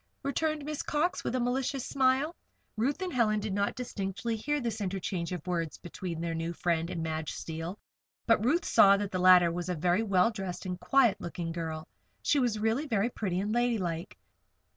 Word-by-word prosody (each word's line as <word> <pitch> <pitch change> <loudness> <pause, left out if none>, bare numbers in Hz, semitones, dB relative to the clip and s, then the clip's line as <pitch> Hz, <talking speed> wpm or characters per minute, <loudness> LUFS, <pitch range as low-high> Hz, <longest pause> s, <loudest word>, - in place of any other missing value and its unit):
returned 300 +1 -1
Miss 300 -1 -3
Cox, 340 +5 0
with 250 - -2
a - - +1
malicious 255 +2 -1
smile. 270 +4 +2 0.4
Ruth 270 - 0
and 365 - -3
Helen 215 -4 +2
did 210 -1 -3
not 200 +1 0
distinctly 200 -2 -3
hear 295 +7 -1
this 230 -4 -3
interchange 185 -3 -2
of 180 -4 -5
words 170 -3 -2
between 175 -1 -6
their 170 -1 -2
new 165 +1 -3
friend 170 -1 0
and 165 -3 -3
Madge 160 -1 -3
Steele; 165 +4 -5 0.5
but 230 -2 +3
Ruth 305 +9 +2
saw 200 0 +6
that 205 -1 -3
the 185 - -1
latter 180 -2 +7
was 175 +1 -4
a 180 - 0
very 175 +5 +2
well 200 -1 +3
dressed 190 -4 -5
and 180 -1 -4
quiet 235 +4 +3
looking 170 0 -4
girl 160 -2 -4
that - - -18
she 290 - +4
was 240 -4 +1
really 225 +8 0
very 225 -1 +1
pretty 185 -6 -2
and 205 +2 -1
ladylike. 205 -8 -1
200 Hz, 195 wpm, -30 LUFS, 175-245 Hz, 0.5 s, latter